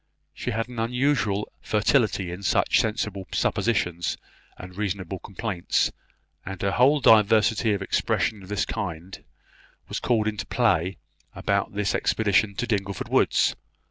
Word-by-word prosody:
She -, -, -5 dB
had 115 Hz, +2 st, -2 dB
an 125 Hz, -2 st, -7 dB
unusual 115 Hz, -3 st, 0 dB
fertility 105 Hz, -4 st, +1 dB
in 90 Hz, +2 st, -7 dB
such 100 Hz, -, +2 dB
sensible 105 Hz, -4 st, -2 dB
suppositions 90 Hz, -7 st, 0 dB, 0.4 s
and 90 Hz, 0 st, -10 dB
reasonable 95 Hz, -2 st, -3 dB
complaints; 100 Hz, -3 st, -1 dB, 0.5 s
and 95 Hz, -1 st, -7 dB
her 100 Hz, -, +1 dB
whole 140 Hz, +6 st, +4 dB
diversity 110 Hz, 0 st, +4 dB
of 100 Hz, -1 st, -2 dB
expressions 105 Hz, +1 st, 0 dB
of 95 Hz, -, -13 dB
this 105 Hz, 0 st, 0 dB
kind 90 Hz, -5 st, -5 dB, 0.6 s
was -, -, -3 dB
called 110 Hz, -3 st, +1 dB
into 105 Hz, -2 st, -3 dB
play 95 Hz, -6 st, +1 dB, 0.4 s
about 100 Hz, 0 st, -1 dB
this 105 Hz, -1 st, 0 dB
expedition 105 Hz, -1 st, +1 dB
to 120 Hz, -, -2 dB
Dingleford 100 Hz, -5 st, -2 dB
woods. -, -, +3 dB
105 Hz, 135 wpm, -25 LUFS, 95-115 Hz, 0.6 s, whole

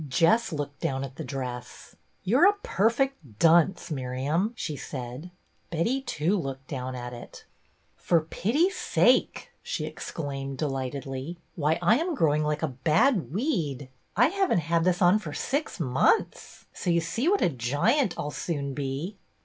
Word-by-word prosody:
Jess 170 Hz, -, +3 dB
looked 145 Hz, -2 st, -4 dB
down 135 Hz, 0 st, -1 dB
at 135 Hz, 0 st, -8 dB
the -, -, -4 dB
dress. 125 Hz, -3 st, -6 dB, 0.3 s
"You're 260 Hz, -, +5 dB
a 410 Hz, -, -1 dB
perfect 225 Hz, -, 0 dB
dunce, 170 Hz, -, +4 dB
Miriam! 140 Hz, -, -1 dB
" -, -, -31 dB
she 155 Hz, -9 st, -4 dB
said. 125 Hz, +5 st, -7 dB, 0.4 s
Betty 225 Hz, +12 st, 0 dB
too 185 Hz, -, 0 dB
looked 135 Hz, -3 st, -6 dB
down 130 Hz, -2 st, -4 dB
at 125 Hz, 0 st, -6 dB
it. 120 Hz, -, -11 dB, 0.3 s
" -, -, -40 dB
For 170 Hz, -2 st, +2 dB
pity's 270 Hz, -, 0 dB
sake! -, -, +2 dB
" -, -, -43 dB
she 485 Hz, +1 st, -3 dB
exclaimed, 135 Hz, -3 st, -5 dB
de 150 Hz, -, 0 dB
lightedly. 135 Hz, +3 st, -4 dB, 0.2 s
"Why, 155 Hz, 0 st, +1 dB
I 220 Hz, +9 st, +5 dB
am 340 Hz, 0 st, -1 dB
growing 155 Hz, -, +2 dB
like 150 Hz, +1 st, -1 dB
a 160 Hz, -, +1 dB
bad 155 Hz, -, +2 dB
weed. 160 Hz, -, -1 dB, 0.3 s
I 245 Hz, +6 st, +6 dB
have 390 Hz, +1 st, 0 dB
n't 175 Hz, -, +3 dB
had 165 Hz, +2 st, +1 dB
this 180 Hz, +1 st, +2 dB
on 180 Hz, +4 st, +5 dB
for 160 Hz, -8 st, -7 dB
six 280 Hz, -, -2 dB
months, 135 Hz, -, +1 dB
so 180 Hz, -, -3 dB
you 170 Hz, 0 st, +4 dB
see 175 Hz, -, 0 dB
what 405 Hz, +1 st, +2 dB
a -, -, +4 dB
giant 155 Hz, -, +1 dB
I -, -, -2 dB
'll 145 Hz, -, -4 dB
soon 140 Hz, -4 st, -3 dB
be." 145 Hz, +8 st, -4 dB
160 Hz, 175 wpm, -27 LUFS, 135-210 Hz, 0.4 s, I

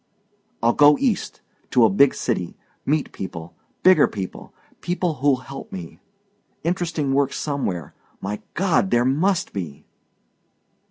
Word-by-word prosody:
"I'll 120 Hz, +1 st, +4 dB
go 145 Hz, +1 st, +6 dB
East 250 Hz, -8 st, -1 dB, 0.3 s
to 120 Hz, -2 st, +5 dB
a -, -, +5 dB
big 140 Hz, +8 st, +4 dB
city 90 Hz, -8 st, -2 dB, 0.3 s
meet 150 Hz, 0 st, +1 dB
people 85 Hz, -3 st, -7 dB, 0.3 s
bigger 185 Hz, 0 st, +7 dB
people 95 Hz, -3 st, -7 dB, 0.3 s
people 175 Hz, -1 st, -1 dB
who'll 140 Hz, -1 st, +4 dB
help 130 Hz, +1 st, -9 dB
me. 85 Hz, -3 st, -8 dB, 0.6 s
Interesting 165 Hz, -5 st, -1 dB
work 140 Hz, 0 st, +2 dB
somewhere. 115 Hz, -, -3 dB, 0.3 s
My 105 Hz, +2 st, -4 dB
God, 190 Hz, +1 st, +2 dB
there 120 Hz, -5 st, +3 dB
MUST 175 Hz, +8 st, +1 dB
be." 75 Hz, -6 st, -6 dB
135 Hz, 125 wpm, -22 LUFS, 100-165 Hz, 0.6 s, bigger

